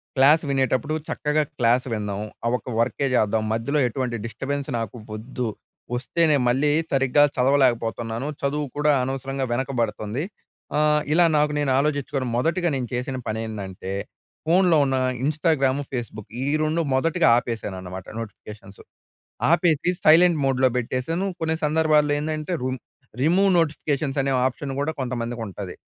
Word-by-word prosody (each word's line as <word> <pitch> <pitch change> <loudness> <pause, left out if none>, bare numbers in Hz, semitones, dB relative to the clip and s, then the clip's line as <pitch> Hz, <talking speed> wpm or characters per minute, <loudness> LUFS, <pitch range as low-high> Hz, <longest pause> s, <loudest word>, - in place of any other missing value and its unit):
Class 145 +4 +5
వినేటప్పుడు 135 +1 +1
చక్కగా 150 +1 0 0.2
class 120 +2 +3
విందాం. 105 -2 -3 0.2
ఆ - - +2
ఒక్క 125 - -10
వర్కే 135 +4 +1
చేద్దాం, 110 -2 +2
మధ్యలో 140 +7 0
ఎటువంటి 125 0 -3
డిస్టర్బెన్స్ 140 +4 -4
నాకు 115 0 -5 0.2
ఒద్దు. 120 +2 -4 0.5
ఒస్తేనే, 150 +4 +2
మళ్ళీ 135 +4 +2 0.2
సరిగ్గా 135 +1 +4
చదవలేకపోతన్నాను, 120 -2 +1
చదువు 145 +1 -1
కూడా 150 0 +3
అనవసరంగా 135 +1 -3
వెనకబడతంది. 120 -1 -2 0.5
ఆహ్, 150 0 +3
ఇలా 175 +2 +5
నాకు 150 0 +2
నేను 145 -2 +1
ఆలోచిచ్చుకోని 140 -2 -1
మొదటిగా 170 +6 +1
నేను 125 -3 -2
చేసిన 125 +2 -2
పనేందంటే, 105 -4 -5 0.5
ఫోన్‍లో 175 0 +4
ఉన్న 135 -1 0 0.3
ఇంస్టాగ్రాము, 145 -3 +1
ఫేస్‌బుక్ 115 -5 -6
ఈ - - -1 0.2
2 155 +2 +1
మొదటిగా 165 +5 +2
ఆపేశాననమాట 95 -6 -5
నోటిఫికేషన్సు 105 -2 -10 0.7
ఆపేసీ 170 -2 +3
సైలెంట్ 165 +1 +6
మోడ్‌లో 130 -1 +3
పెట్టేశాను. 130 +9 -2
కొన్ని 160 0 0
సందర్భాల్లో 150 -1 +3
ఏందంటే, 155 +3 -3
రుమ్ 130 0 -2 0.4
రిమూవ్ 180 +7 +4
నోటిఫికేషన్స్ 145 -3 -1
అనే 135 0 0
ఆప్షన్ 135 +2 -2
గూడా 145 +3 0
కొంతమందికుంటది. 115 -6 -4
135 Hz, 125 wpm, -23 LUFS, 120-150 Hz, 0.7 s, సైలెంట్